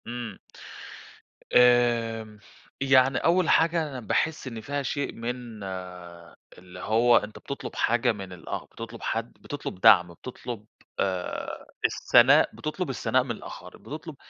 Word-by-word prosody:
إمم، 120 Hz, -4 st, -6 dB, 1.2 s
آمم، 115 Hz, -3 st, +3 dB, 0.4 s
يعني 135 Hz, -1 st, +4 dB
أول 175 Hz, +1 st, +2 dB
حاجة 165 Hz, 0 st, +3 dB
أنا 130 Hz, -2 st, -6 dB
باحس 145 Hz, +6 st, -1 dB
إن 115 Hz, -3 st, -6 dB
فيها 140 Hz, +4 st, -3 dB
شيء 140 Hz, +1 st, -2 dB
من 115 Hz, -2 st, -6 dB, 0.9 s
اللي 90 Hz, 0 st, -12 dB
هو 115 Hz, +5 st, +4 dB
أنت 105 Hz, +1 st, -4 dB
بتطلُب 140 Hz, -, -7 dB
حاجة 120 Hz, +1 st, +2 dB
من 95 Hz, -4 st, -7 dB
ال 90 Hz, -, -12 dB
آه، -, -, -4 dB
بتطُلب 115 Hz, 0 st, -9 dB
حد، 115 Hz, +1 st, -3 dB
بتطلُب 145 Hz, -10 st, -7 dB
دعْم 90 Hz, -2 st, +7 dB
آآ، -, -, -12 dB
بتطلُب 120 Hz, 0 st, -8 dB, 0.3 s
آآ 90 Hz, -2 st, -3 dB, 0.2 s
الثناء، -, -, +5 dB
بتطلُب -, -, -4 dB
الثناء -, -, +1 dB
من -, -, -5 dB
الآخَر، -, -, -9 dB
بتطلُب -, -, -8 dB
120 Hz, 135 wpm, -26 LUFS, 105-130 Hz, 1.2 s, دعْم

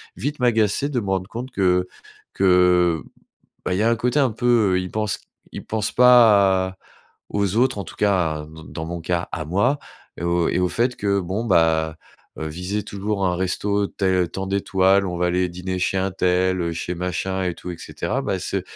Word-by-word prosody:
vite 145 Hz, +3 st, -4 dB
m'agacer 115 Hz, +1 st, +2 dB
de 130 Hz, -4 st, -1 dB
me 100 Hz, -, -5 dB
rendre 95 Hz, -1 st, -1 dB
compte 125 Hz, +3 st, -6 dB
que 90 Hz, -3 st, +1 dB, 0.5 s
que, 90 Hz, -3 st, +3 dB, 0.6 s
bah, 90 Hz, -, 0 dB
il -, -, -1 dB
y 105 Hz, -, +2 dB
a 115 Hz, -, +3 dB
un -, -, +3 dB
côté 125 Hz, +5 st, 0 dB
un 135 Hz, -4 st, +3 dB
peu, 120 Hz, +3 st, -3 dB, 0.3 s
heu, -, -, +1 dB
ils 90 Hz, 0 st, -5 dB
pensent 105 Hz, -1 st, -2 dB
q -, -, -26 dB, 0.3 s
ils -, -, -7 dB
pensent 110 Hz, -2 st, -1 dB
pas 105 Hz, -7 st, +6 dB
à 95 Hz, 0 st, -12 dB, 0.5 s
aux 100 Hz, -1 st, 0 dB
autres, 130 Hz, +1 st, +2 dB
en 100 Hz, -, -3 dB
tout -, -, -11 dB
cas, 85 Hz, -7 st, +1 dB
dans 80 Hz, 0 st, -12 dB
dans 80 Hz, +2 st, -7 dB
mon 85 Hz, 0 st, -5 dB
cas, 85 Hz, +1 st, -2 dB
à 80 Hz, -, -3 dB
moi, 100 Hz, -, +1 dB, 0.4 s
et -, -, -6 dB
au 85 Hz, -1 st, +1 dB
et -, -, 0 dB
au 90 Hz, -, +2 dB
fait 120 Hz, +8 st, 0 dB
que, 100 Hz, -1 st, 0 dB
bon, 95 Hz, +6 st, -3 dB
bah, 80 Hz, -5 st, +2 dB, 0.4 s
heu, 80 Hz, -, -4 dB
viser 90 Hz, +6 st, -3 dB
toujours 100 Hz, 0 st, -2 dB
un 90 Hz, -1 st, 0 dB
resto 100 Hz, +2 st, 0 dB
tel 95 Hz, -3 st, 0 dB
tant 95 Hz, 0 st, -4 dB
d'étoiles, 95 Hz, 0 st, +2 dB
on 90 Hz, -1 st, -3 dB
va 90 Hz, -, +1 dB
aller 90 Hz, +1 st, +1 dB
dîner 90 Hz, +1 st, -4 dB
chez 95 Hz, +1 st, 0 dB
un 95 Hz, +1 st, 0 dB
tel, 90 Hz, 0 st, +1 dB
heu, 85 Hz, -1 st, -1 dB
chez 85 Hz, +2 st, -4 dB
machin 90 Hz, +2 st, -2 dB
et 90 Hz, -1 st, -1 dB
tout 90 Hz, -, -8 dB
et 85 Hz, -, -6 dB
cetera, -, -, -3 dB
bah -, -, -1 dB
ce -, -, -3 dB
95 Hz, 215 wpm, -22 LUFS, 90-105 Hz, 0.6 s, pas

